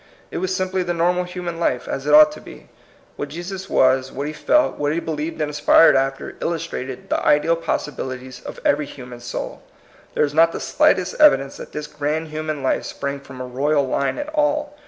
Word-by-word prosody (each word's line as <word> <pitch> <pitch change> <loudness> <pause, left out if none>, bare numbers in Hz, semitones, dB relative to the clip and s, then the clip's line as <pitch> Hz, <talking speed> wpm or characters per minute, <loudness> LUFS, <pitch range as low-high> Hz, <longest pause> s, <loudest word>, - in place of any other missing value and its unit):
It - - -3
was 185 +1 -1
simply 185 0 -1
the 175 -1 -2
normal 180 +2 +1
human 180 -2 -5
life, 125 -7 0
as 135 +1 -4
it 150 - +3
ought 150 0 +8
to - - -10
be. - - -13 0.5
What 145 - -4
Jesus 185 +5 -6
was, 130 0 +3
what 140 +2 -4
he 150 - -4
felt, 305 - +2
what 145 0 +1
he 160 - 0
believed 160 0 -4
and 150 - 0
aspired 150 +2 +6
after, 135 0 -1
illustrated 160 -6 -4
the - - 0
ideal 150 +3 +3
possibilities 130 -5 -4
of - - -8
every 145 0 +2
human 125 -2 -10
soul. 120 - -6 0.5
There - - +3
is 145 - -6
not 165 +2 +4
the - - -4
slightest 185 +8 +1
evidence 140 - +5
that - - -9
this 150 - -5
grand 150 +2 -3
human 155 -2 -4
life 130 - 0
sprang 140 0 -4
from 135 -2 -12
a - - -4
royal 140 +3 +1
line 140 +1 -1
at 295 0 -4
all. 295 -1 0
150 Hz, 200 wpm, -21 LUFS, 140-175 Hz, 0.5 s, ought